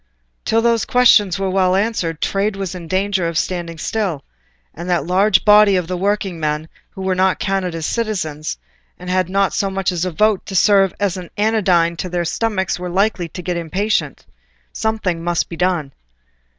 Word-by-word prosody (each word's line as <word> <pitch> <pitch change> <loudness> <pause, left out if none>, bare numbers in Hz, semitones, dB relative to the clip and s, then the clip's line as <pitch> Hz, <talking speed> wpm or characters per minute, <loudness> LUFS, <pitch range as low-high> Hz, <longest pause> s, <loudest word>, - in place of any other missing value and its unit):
Till 225 +1 +2
those 235 -1 +2
questions 215 -7 +4
were 195 -1 -1
well 185 -1 +2
answered 190 -6 -1
trade 200 +1 0
was 195 -2 -4
in 175 -2 -8
danger 190 0 0
of 165 -1 -3
standing 170 -2 -2
still, 185 -4 -2 0.5
and 170 +3 -7
that 175 -1 +1
large 190 +4 +3
body 210 -1 +6
of 180 -2 0
the 180 +2 -4
working 195 -2 -1
men 155 +1 -2 0.2
who 190 - -8
were 190 0 +1
not 185 0 +2
counted 190 -3 -2
as 165 -1 -4
citizens 160 - -3 0.4
and 180 0 -6
had 185 -1 +1
not 195 0 +1
so 195 - 0
much 190 -1 -1
as 175 -1 -2
a 185 - 0
vote 210 +3 +1
to 195 - -6
serve 195 0 +4
as 200 -2 0
an 180 -2 -8
anodyne 185 -6 +2
to 185 - -4
their 175 0 -1
stomachs 190 -1 -1
were 180 0 -4
likely 185 -2 0
to 180 - -8
get 175 +1 -2
impatient. 170 -2 -2 0.5
Something 200 -7 -2
must 175 0 -1
be 170 - -6
done. 175 -5 0
185 Hz, 190 wpm, -19 LUFS, 170-200 Hz, 0.5 s, body